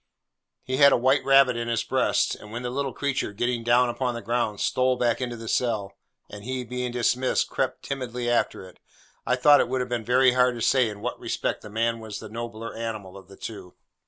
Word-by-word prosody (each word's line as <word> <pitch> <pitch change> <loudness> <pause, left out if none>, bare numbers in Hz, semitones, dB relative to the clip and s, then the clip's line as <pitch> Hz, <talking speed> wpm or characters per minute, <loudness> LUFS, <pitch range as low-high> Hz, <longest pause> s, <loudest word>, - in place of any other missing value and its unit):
He 130 0 -2
had 140 0 +7
a - - +4
white 130 +3 +2
rabbit 135 -2 +5
in 120 0 -3
his 115 -1 0
breast; - - +1
and 105 - -11
when 120 +2 -5
the 125 - -3
little 135 +1 -2
creature, 140 -7 -2
getting 120 +2 -1
down 120 +2 +4
upon 120 +1 -2
the 120 - -5
ground, 120 -3 -1
stole 130 0 +1
back 120 0 +1
into 120 -1 -3
the 115 -1 -9
cell, 110 -5 -1 0.3
and 105 0 -10
he, 130 +2 -3
being 125 +1 -4
dismissed, 125 +1 +1
crept 130 -1 -2
timidly 125 -3 -4
after 120 -5 0
it, 90 - -18 0.5
I 125 - +3
thought 145 +3 +6
it 120 - +1
would 130 0 -1
have 125 0 -3
been 120 -2 -2
very 125 +2 +4
hard 125 0 +3
to 115 - -6
say 130 -4 +3
in 105 -1 -9
what 125 +3 -4
respect - - -2
the 105 - -10
man 115 +2 -1
was 110 -2 -7
the 110 - -9
nobler 115 0 -6
animal 110 -5 -5
of 95 - -12
the 95 - -15
two. 100 -5 -9
120 Hz, 225 wpm, -25 LUFS, 115-125 Hz, 0.5 s, had